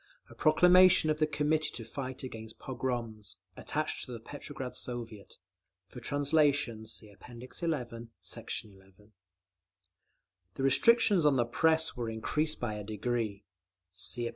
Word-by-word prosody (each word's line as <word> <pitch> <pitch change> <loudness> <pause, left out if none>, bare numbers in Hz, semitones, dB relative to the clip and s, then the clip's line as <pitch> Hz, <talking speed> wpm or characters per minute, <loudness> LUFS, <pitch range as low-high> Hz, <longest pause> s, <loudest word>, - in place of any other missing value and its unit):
A - - -10
proclamation 180 +1 +6
of 155 - -2
the 155 - +3
Committee 150 +1 +1
to 115 - -5
Fight 130 +2 -5
against 110 -3 -8
Pogroms, 120 -5 -4 0.2
attached 155 +1 -2
to - - -8
the 120 - -6
Petrograd 135 +1 -7
Soviet. 115 -4 -4 0.5
For 125 - -9
translation 145 -5 +1
see 110 -1 -4
App. - - -22
XI, 125 +7 -5 0.5
Sect. - - -3
11. 95 -2 -18 1.7
The 135 - -3
restrictions 205 - +5
on 150 -2 +4
the 120 -2 +2
Press 160 +6 +2
were 120 -2 -3
increased 150 +8 -1
by 120 -3 -2
a 105 0 -5
decree 110 -1 -3 0.5
(See 100 +6 -2
App. - - -3
125 Hz, 140 wpm, -31 LUFS, 110-150 Hz, 1.7 s, proclamation